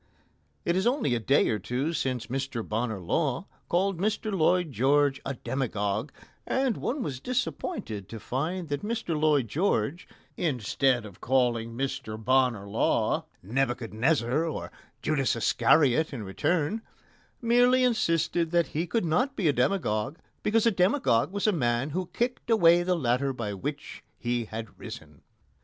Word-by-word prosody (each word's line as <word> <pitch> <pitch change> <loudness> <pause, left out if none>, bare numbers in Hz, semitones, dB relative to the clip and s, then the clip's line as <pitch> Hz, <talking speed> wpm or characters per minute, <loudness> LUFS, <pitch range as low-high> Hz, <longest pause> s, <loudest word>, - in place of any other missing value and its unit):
It 170 - +2
is 190 +4 +2
only 245 - +1
a 120 - +1
day 135 +5 +3
or 110 - 0
two 130 - -2
since 130 -6 -1
Mr 130 -2 -3
Bonar 110 -1 -2
Law 135 - -1 0.2
called 185 0 +1
Mr 215 +1 -1
Lloyd 175 -1 +2
George 135 +3 +2
a 140 - -3
demagogue, 115 -2 -2 0.3
and 265 -4 0
one 270 +1 -2
was 135 -4 -4
disappointed 135 - -3
to 115 - -7
find 155 - -3
that 145 -1 -2
Mr 210 -6 -2
Lloyd 150 -5 +2
George, 150 - 0 0.3
instead 130 - +1
of 100 -4 -12
calling 120 -3 +1
Mr 135 -5 -3
Bonar 125 -2 +2
Law 100 - +1 0.2
Nebuchadnezzar 120 - 0
or 160 - -4 0.3
Judas 135 -5 +1
Iscariot 145 +5 +3
in 125 -6 -5
return, 165 - 0 0.6
merely 245 +2 +4
insisted 170 -8 +1
that 170 0 +2
he 165 +4 -2
could 225 -2 0
not 255 - +1
be 190 - 0
a 145 - +4
demagogue, 125 - 0 0.2
because 225 +1 +2
a 230 - +5
demagogue 180 - +2
was 200 0 -2
a 215 - +5
man 125 -4 0
who 180 +2 -3
kicked 245 0 -2
away 175 -6 +6
the 180 +1 +1
ladder 135 -2 +1
by 115 -5 -4
which 145 +9 -6
he 120 -1 -1
had 110 -1 -8
risen. 75 -2 -10
140 Hz, 150 wpm, -28 LUFS, 120-175 Hz, 0.6 s, away